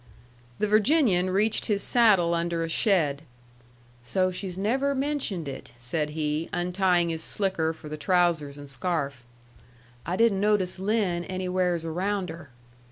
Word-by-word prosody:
The -, -, +1 dB
Virginian 215 Hz, -, +3 dB
reached 205 Hz, +4 st, +1 dB
his 200 Hz, -2 st, 0 dB
saddle 200 Hz, -8 st, +4 dB
under 170 Hz, 0 st, -1 dB
a 165 Hz, -, -3 dB
shed. 160 Hz, -7 st, +2 dB, 0.8 s
"So 185 Hz, +9 st, 0 dB
she's 185 Hz, 0 st, -4 dB
never 265 Hz, +8 st, 0 dB
mentioned 265 Hz, -, -2 dB
it," 135 Hz, -3 st, -8 dB
said 150 Hz, +6 st, -2 dB
he, 155 Hz, +1 st, -1 dB
untying 180 Hz, -1 st, +1 dB
his 160 Hz, -1 st, -2 dB
slicker 185 Hz, -5 st, 0 dB
for 160 Hz, -1 st, -11 dB
the 155 Hz, 0 st, -6 dB
trousers 165 Hz, -4 st, +1 dB
and 145 Hz, 0 st, -10 dB
scarf. 140 Hz, -1 st, -3 dB, 0.8 s
"I 175 Hz, -, -2 dB
didn't 220 Hz, -1 st, +3 dB
notice 205 Hz, -3 st, +1 dB
Lin 195 Hz, -4 st, 0 dB
anywheres 180 Hz, -2 st, -1 dB
around 185 Hz, +2 st, -2 dB
her." 165 Hz, -3 st, -11 dB
180 Hz, 140 wpm, -26 LUFS, 160-200 Hz, 0.8 s, saddle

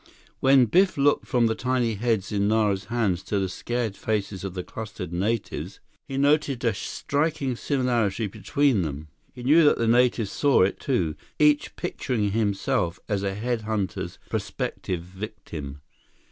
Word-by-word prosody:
When 135 Hz, -1 st, +6 dB
Biff 185 Hz, -, +3 dB
looked 145 Hz, +1 st, +2 dB
from 120 Hz, -2 st, +3 dB
the 110 Hz, -, +2 dB
tiny 125 Hz, -1 st, 0 dB
heads 110 Hz, -2 st, -1 dB
in 100 Hz, -1 st, +1 dB
Nara's 105 Hz, -3 st, +1 dB
hands 105 Hz, -7 st, 0 dB
to 105 Hz, -, -1 dB
the 95 Hz, -1 st, 0 dB
scared 115 Hz, +2 st, -3 dB
faces 100 Hz, -3 st, -2 dB
of 95 Hz, -2 st, -5 dB
the 90 Hz, -, -3 dB
clustered 105 Hz, -6 st, -7 dB
natives, 105 Hz, +5 st, -2 dB, 0.3 s
he 135 Hz, -, -4 dB
noted 140 Hz, -2 st, +2 dB
a 115 Hz, -, +3 dB
striking 140 Hz, +5 st, -1 dB
similarity 120 Hz, -6 st, 0 dB
between 110 Hz, +4 st, +1 dB
them. 75 Hz, -1 st, -5 dB, 0.3 s
He 125 Hz, -, -8 dB
knew 155 Hz, +6 st, +6 dB
that 150 Hz, -, +5 dB
the 115 Hz, -, 0 dB
natives 120 Hz, -3 st, +3 dB
saw 140 Hz, -8 st, +4 dB
it, 95 Hz, -, 0 dB
too, 90 Hz, -, 0 dB, 0.2 s
each 150 Hz, -1 st, +3 dB
picturing 105 Hz, -6 st, -2 dB
himself 100 Hz, -5 st, 0 dB
as 100 Hz, -2 st, 0 dB
a 100 Hz, -1 st, -2 dB
head 120 Hz, +2 st, -1 dB
hunter's 105 Hz, -3 st, -3 dB
prospective 90 Hz, -3 st, -3 dB
victim. 90 Hz, -7 st, -8 dB
110 Hz, 155 wpm, -25 LUFS, 95-125 Hz, 0.3 s, When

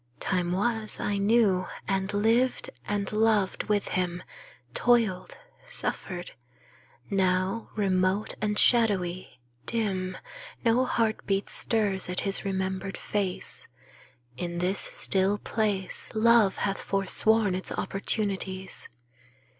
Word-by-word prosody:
Time 180 Hz, -2 st, 0 dB
was 215 Hz, +3 st, -1 dB
I 205 Hz, -1 st, -1 dB
knew, 200 Hz, -3 st, +3 dB, 0.2 s
and 195 Hz, 0 st, 0 dB
lived 225 Hz, +5 st, +2 dB, 0.2 s
and 205 Hz, -1 st, -1 dB
loved 215 Hz, -3 st, +2 dB
with 210 Hz, -1 st, 0 dB
him; 180 Hz, -1 st, -1 dB, 0.5 s
Toiled, 230 Hz, -7 st, +2 dB, 0.3 s
suffered. 185 Hz, -, -3 dB, 0.8 s
Now, 190 Hz, +2 st, +1 dB
remote 190 Hz, 0 st, +1 dB
and 210 Hz, -1 st, 0 dB
shadowy, 185 Hz, -, +2 dB, 0.3 s
dim, 190 Hz, -5 st, -1 dB, 0.5 s
No 240 Hz, +3 st, +4 dB
heartbeat 215 Hz, -4 st, 0 dB
stirs 205 Hz, -5 st, 0 dB
at 180 Hz, -, 0 dB
his 195 Hz, -1 st, 0 dB
remembered 190 Hz, 0 st, -2 dB
face. 195 Hz, -3 st, -3 dB, 0.7 s
In 175 Hz, +2 st, -3 dB
this 180 Hz, +3 st, 0 dB
still 195 Hz, +1 st, +1 dB
place 205 Hz, -4 st, -2 dB
Love 220 Hz, -3 st, +5 dB
hath 195 Hz, -1 st, -1 dB
forsworn 200 Hz, +1 st, +1 dB
its 185 Hz, +1 st, -3 dB
opportunities. 195 Hz, -2 st, -2 dB
195 Hz, 100 wpm, -28 LUFS, 185-215 Hz, 0.8 s, Love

